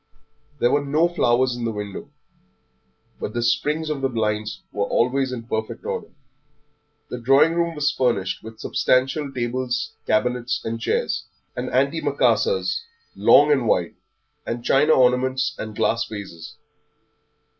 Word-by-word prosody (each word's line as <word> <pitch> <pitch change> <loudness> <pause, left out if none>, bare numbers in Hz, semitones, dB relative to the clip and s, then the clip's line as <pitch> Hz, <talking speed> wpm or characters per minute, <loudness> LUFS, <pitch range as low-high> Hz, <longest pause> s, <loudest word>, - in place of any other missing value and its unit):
There 120 - +2
were 145 - +2
no 150 +4 +2
flowers 130 -7 +2
in 120 - -5
the 115 - -1
windows, 105 -2 -6 1.1
but 105 - -5
the 120 - 0
springs 150 +6 0
of 150 -3 -3
the 135 - +1
blinds 110 -2 -2
were 100 -1 -1
always 130 +2 +1
in 120 -2 -5
perfect 110 -1 -4
order. - - -3 1.0
The 125 - -4
drawing 135 +6 +5
room 170 -1 0
was 150 0 +1
furnished 120 -9 0
with 110 0 -11
substantial 135 +5 +1
tables, 125 0 -2
cabinets 125 +2 0
and 115 0 -3
chairs, 475 - -1 0.3
and - - -3
antimacassars, 470 0 +1 0.3
long 145 +1 +6
and 135 -5 +2
wide, 90 -5 +1 0.5
and 120 0 -5
china 150 +3 +4
ornaments 130 +2 +2
and 110 -1 -6
glass 115 - +1
vases. 100 -6 -8
125 Hz, 135 wpm, -23 LUFS, 115-140 Hz, 1.1 s, long